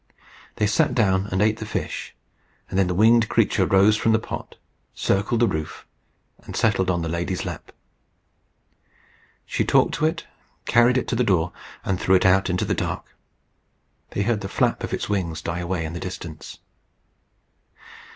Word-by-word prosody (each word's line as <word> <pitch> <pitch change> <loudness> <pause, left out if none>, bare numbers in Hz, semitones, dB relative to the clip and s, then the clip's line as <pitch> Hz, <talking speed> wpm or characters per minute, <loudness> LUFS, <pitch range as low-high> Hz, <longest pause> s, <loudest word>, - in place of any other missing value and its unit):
They 105 - +1
sat 105 - +2
down 95 -4 +2
and 95 0 0
ate 110 0 +2
the 110 - -5
fish, - - -4 0.6
and 95 - 0
then 95 - +3
the 90 - -1
winged 110 +3 +4
creature - - +2
rose 100 +2 +5
from 110 +1 +2
the - - +5
pot, 110 - -7 0.4
circled 100 +4 0
the 120 - +5
roof, 80 -4 -4 0.6
and - - -9
settled 95 -4 +1
on 85 -2 0
the - - -2
lady's 85 +3 -2
lap. - - -7 1.7
She - - -1
talked - - +3
to 155 - +1
it, 170 +1 -3 0.4
carried 120 +2 +4
it 130 - -1
to 125 - 0
the 125 - +2
door, 90 -6 +1 0.3
and 95 -2 -1
threw 95 - +3
it 95 - +3
out 95 +1 +4
into 90 0 0
the - - 0
dark. - - -4 0.9
They 100 - -2
heard 110 -1 0
the 95 - -5
flap - - 0
of - - -4
its - - -2
wings 90 -6 -2
die 85 +1 -4
away 85 -1 -2
in 80 - -5
the 85 - -5
distance. 85 -4 -8
95 Hz, 175 wpm, -23 LUFS, 90-110 Hz, 1.7 s, rose